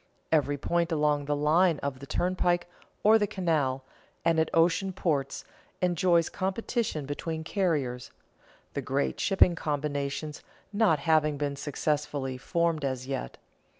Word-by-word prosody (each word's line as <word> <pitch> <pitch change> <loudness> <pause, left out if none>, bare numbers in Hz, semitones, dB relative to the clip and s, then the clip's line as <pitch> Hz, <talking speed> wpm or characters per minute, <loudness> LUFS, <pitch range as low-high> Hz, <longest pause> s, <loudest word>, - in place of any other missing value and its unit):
Every 145 -2 +2
point 170 +4 0
along 150 -2 +1
the 145 +1 0
line 160 +3 +3
of 140 -2 -3
the 140 - -10
turnpike 175 +1 +1 0.4
or 220 +1 +6
the 205 - +1
canal 155 -10 0 0.4
and 165 -1 +3
at 160 - +2
ocean 175 +4 +2
ports 150 -7 -1 0.3
enjoys 175 -1 +3
competition 195 - -2
between 160 +3 -4
carriers, 150 -10 -1 0.6
the 140 - -2
great 135 +2 -1
shipping 190 -3 +4
combinations 145 -1 -3 0.3
not 205 -7 +4
having 150 0 +2
been 140 -1 -2
successfully 145 -2 -2
formed 170 +1 0
as 130 -2 -2
yet. 135 - -4
155 Hz, 130 wpm, -28 LUFS, 140-175 Hz, 0.6 s, or